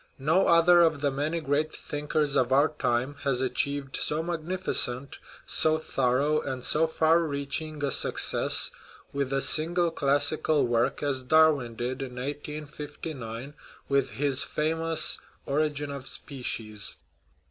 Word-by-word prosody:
No 160 +8 +2
other 170 +1 +6
of 160 -4 +2
the 145 -1 +1
many 150 +5 -2
great 155 +1 0
thinkers 150 0 -2
of 130 -2 +2
our 140 +3 +4
time 130 -1 -2
has 135 -3 0
achieved 135 +1 -1
so 155 +2 -1
magnificent, 160 -6 -2 0.3
so 155 0 +4
thorough, 140 0 0
and 130 -2 -5
so 160 +4 +2
far 160 +1 +3
reaching 150 0 -3
a 140 - -1
suc - - -1
cess - - +3 0.4
with 140 -1 -2
a 135 0 +1
single 170 +4 +3
classical 145 +1 +1
work 120 +3 0
as 140 -2 0
Darwin 145 -4 +3
did 125 +3 -4
in 130 -2 -6
1859 145 -2 -6 0.3
with 140 -1 +1
his 140 -1 +1
famous 160 +1 +1 0.3
Origin 145 0 -1
of 140 -2 -7
Species. 110 -6 -4
145 Hz, 135 wpm, -27 LUFS, 135-155 Hz, 0.4 s, other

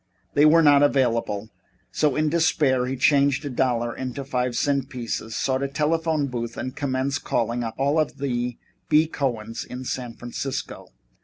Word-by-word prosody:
They 145 +1 +5
were 165 +2 +6
not 145 -2 +6
available, 115 -7 +1 0.4
so 150 -3 +1
in 155 0 +1
despair 145 -6 +2
he 130 - -2
changed 140 +1 +3
a 140 - -3
dollar 120 -2 0
into 130 +1 -5
five 125 -2 -1
cent 140 0 0
pieces, 115 -3 -4
sought 130 0 0
a 140 - 0
telephone 155 +1 0
booth 120 -3 -4
and 130 - -4
commenced 135 -1 -1
calling 120 +1 -1
up 115 -1 -4
all 145 +4 +2
the 125 -4 -3 0.3
B. 155 +1 +5
Cohens 120 -7 -3
in 125 +1 -7
San 120 -2 -4
Francisco. 125 +2 -5
130 Hz, 160 wpm, -24 LUFS, 120-145 Hz, 0.4 s, were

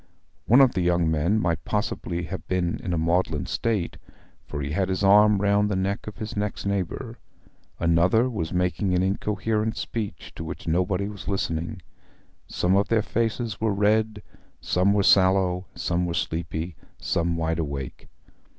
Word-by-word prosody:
One 125 +5 +7
of 130 -3 +6
the 95 - 0
young 85 -2 +2
men 85 +8 +2
might 85 -4 -1
possibly 90 -5 -2
have 90 -3 -6
been 90 -2 -1
in 90 - -4
a 85 - 0
maudlin 85 -2 +1
state, 110 -7 -1 0.5
for 75 - -5
he 70 +1 -3
had 95 +4 0
his 95 +1 -1
arm 105 +1 +6
round 100 +1 +2
the 100 - 0
neck 95 +3 -2
of 105 - -7
his 110 0 -5
next 105 -1 -3
neighbour. 100 -3 -3 0.6
Another 85 +8 +3
was 100 -10 -3
making 90 +1 0
an 90 - +2
incoherent 105 +3 -1
speech 110 -3 -5
to - - -6
which 80 +1 -7
nobody 90 +4 +1
was 105 -1 -9
listening. 85 0 -2 0.6
Some 90 +2 +1
of 100 +1 +2
their 110 -2 +2
faces 115 0 -2
were 110 -3 +1
red, 105 +1 +1 0.4
some 90 +2 +2
were 100 -1 +2
sallow; 95 -1 +4
some 90 0 -1
were 85 - -2
sleepy, 80 +1 -3 0.2
some 85 0 -1
wide 80 0 -1
awake. 70 -5 -5
95 Hz, 165 wpm, -25 LUFS, 85-105 Hz, 0.6 s, One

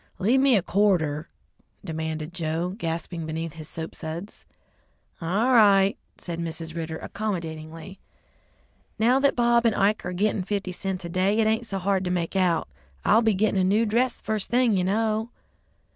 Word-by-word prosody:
"Leave 230 +8 +3
me 265 -4 +5
a 190 - 0
quarter," 170 -7 +1 0.6
demanded 160 -1 -4
Joe, 165 0 -2
gasping 165 -3 -4
beneath 160 0 -4
his 155 -2 -9
soap 160 0 -6
suds. 170 +5 -7 0.8
"All 200 +10 +1
right," 200 -4 +5 0.2
said 170 -1 -6
Mrs. 165 -1 -5
Ridder 160 -1 -4
accommodatingly; 165 -3 -5 1.0
"now 245 +4 +4
that 280 0 +3
Bob 235 -1 +3
and 230 -2 +2
Ike 205 +2 +2
are 180 - -4
gitting 200 +2 0
fifty 195 0 -3
cents 185 0 -3
a - - -5
day, 190 +5 +1
it 220 - +3
ain't 220 +2 +1
so 195 - -3
hard 190 0 0
to - - -1
make 180 0 -2
out. 180 -3 +2 0.4
I'll 225 - +5
be 220 -3 +2
gittin' 200 -1 +2
a - - +2
new 205 +5 +3
dress 240 +4 0
first 215 -2 -2
thing, 240 -3 +3
you 185 - +1
know." 220 +3 0
190 Hz, 170 wpm, -25 LUFS, 165-215 Hz, 1.0 s, me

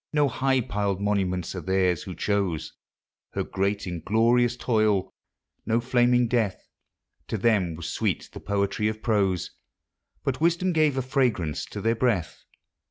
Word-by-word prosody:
No 150 -2 +3
high 130 +1 +1
piled 100 -5 -1
monuments 95 -4 -1
are 90 - -5
theirs 90 -1 +1
who 90 - -7
chose 100 -4 -1 0.6
Her - - -1
great 100 +2 -1
inglorious 115 +8 +2
toil—no 110 0 -1
flaming 125 0 +3
death; 110 -5 0 0.7
To - - -2
them 95 -6 +2
was 80 0 -6
sweet - - -1
the - - -7
poetry 100 +1 0
of 110 0 -4
prose, 100 -6 +1 0.7
But 135 +2 -2
wisdom 170 +2 +2
gave 155 -4 +2
a 130 - 0
fragrance 110 - 0
to 105 - -6
their 115 +2 +2
breath. 115 -8 -1
105 Hz, 140 wpm, -26 LUFS, 95-125 Hz, 0.7 s, No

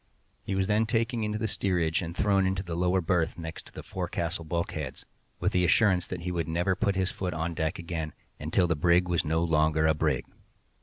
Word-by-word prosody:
He 95 - -3
was 95 0 +2
then 105 +2 +2
taken 115 0 0
into 105 0 -1
the 110 +1 -1
steerage, 90 -5 0
and 85 0 -6
thrown 100 -2 +3
into 95 0 -1
a 85 - -3
lower 90 +2 +2
berth 85 -1 0
next 80 -1 -7
to - - -14
the - - -9
forecastle 85 0 -3
bulkheads, 80 -4 -3 0.3
with - - +1
the 90 - +2
assurance 90 -1 +3
that 90 -2 -5
he 90 +1 -3
should 85 -2 -1
never 90 +3 +1
put 100 +1 0
his 95 -1 0
foot 90 -4 -3
on 80 +2 -2
deck 80 0 -1
again 85 -3 -4 0.3
"until 80 +5 +2
the 85 -1 +1
brig 85 +3 +3
was 85 -2 +1
no 80 +2 +1
longer 80 -1 +2
a 80 - +5
brig." 75 - 0
85 Hz, 215 wpm, -28 LUFS, 80-95 Hz, 0.3 s, a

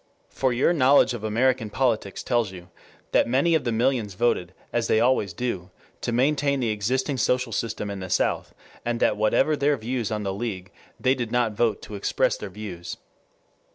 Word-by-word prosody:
For 130 -1 0
your 125 +8 +3
knowledge 140 -4 +5
of 115 -3 -6
American 115 +1 +1
politics 110 -5 -1
tells 120 -5 +1
you 90 -1 -11 0.4
that - - +3
many 135 +8 +2
of 160 - +2
the 120 - +1
millions 115 -3 0
voted, 90 -5 +1 0.2
as 120 -1 +1
they 110 - +3
always 115 -5 +2
do, 95 -3 -3 0.3
to - - -2
maintain 140 +3 +2
the 120 -3 0
existing 130 +7 -1
social 125 0 +1
system 110 -2 -3
in 100 - -5
the 95 -1 -6
South, - - 0 0.3
and 120 0 -1
that 105 - +3
whatever 110 +8 +2
their 145 0 +2
views 120 -1 -2
on 105 -1 -2
the 95 -1 -2
League, 100 -3 -5 0.3
they 130 - +3
did 120 -4 -4
not 120 -2 +2
vote 115 +1 0
to - - -9
express 100 - +1
their 105 - -7
views. 90 -4 -7
115 Hz, 190 wpm, -25 LUFS, 105-130 Hz, 0.4 s, knowledge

